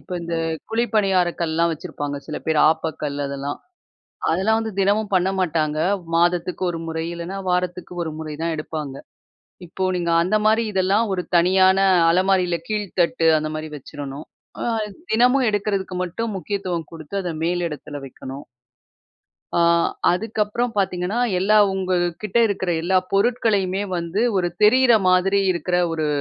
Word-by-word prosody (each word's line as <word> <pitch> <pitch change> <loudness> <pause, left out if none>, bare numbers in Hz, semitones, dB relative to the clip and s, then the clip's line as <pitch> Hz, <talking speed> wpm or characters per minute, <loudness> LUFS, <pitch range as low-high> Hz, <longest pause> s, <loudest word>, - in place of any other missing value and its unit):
இப்ப - - -11
இந்த 170 0 -3 0.3
குழி 230 +2 +1
பணியார 190 -4 +3
கல்லெல்லாம் 170 0 +1
வச்சிருப்பாங்க 145 -1 -5
சில 155 - -4
பேரு 160 -1 +2
ஆப்பக்கல் 155 -3 -3
அதெல்லாம். 140 +1 -4 0.7
அதெல்லாம் 210 +7 +2
வந்து 220 -1 -3
தினமும் 205 +1 +1
பண்ண 185 +1 +2
மாட்டாங்க. 155 -4 0 0.4
மாதத்துக்கு 175 +2 +1
ஒரு 165 - -5
முறை 160 0 -3
இல்லனா 170 +3 -6
வாரத்துக்கு 180 0 -2
ஒரு 160 - -4
முறை 155 -1 -5
தான் 165 0 -1
எடுப்பாங்க. 155 -3 -5 0.7
இப்போ 185 +2 -4
நீங்க 170 -1 -1
அந்த 200 +5 +1
மாரி 220 +2 +4
இதெல்லாம் 195 +4 +2
ஒரு 180 - -2
தனியான 185 +2 +4 0.3
அலமாரியில 185 -1 +2
கீழ்த்தட்டு, 185 -6 0
அந்தமாதிரி 155 0 -4
வச்சுறணும். 140 +1 -8 0.3
அ - - -2 0.5
தினமும் 250 +3 +4
எடுக்கிறதுக்கு 200 -2 -2
மட்டும் 210 +5 -4
முக்கியத்துவம் 180 -3 -3
குடுத்து 165 +3 -8
அத 175 - -3
மேல் 175 +1 0
இடத்துல 145 -1 -7
வைக்கணும். 135 +1 -9 1.1
அ - - +3 0.5
அதுக்கப்புறம் 220 +4 -1
பாத்தீங்கன்னா, 185 +2 -1 0.2
எல்லா 200 +4 +3 0.2
உங்க 190 -1 -2 0.3
கிட்ட 210 +2 0
இருக்கிற 190 -2 -2
எல்லா 185 +2 +2 0.2
பொருட்களையுமே 200 -3 +1
வந்து 170 +6 -1
ஒரு 175 -2 +1
தெரியுற 245 +3 +6
மாதிரி 185 +2 +3
இருக்கிற 175 +1 -1 0.2
ஒரு 160 -1 -1
180 Hz, 135 wpm, -22 LUFS, 165-200 Hz, 1.1 s, தெரியுற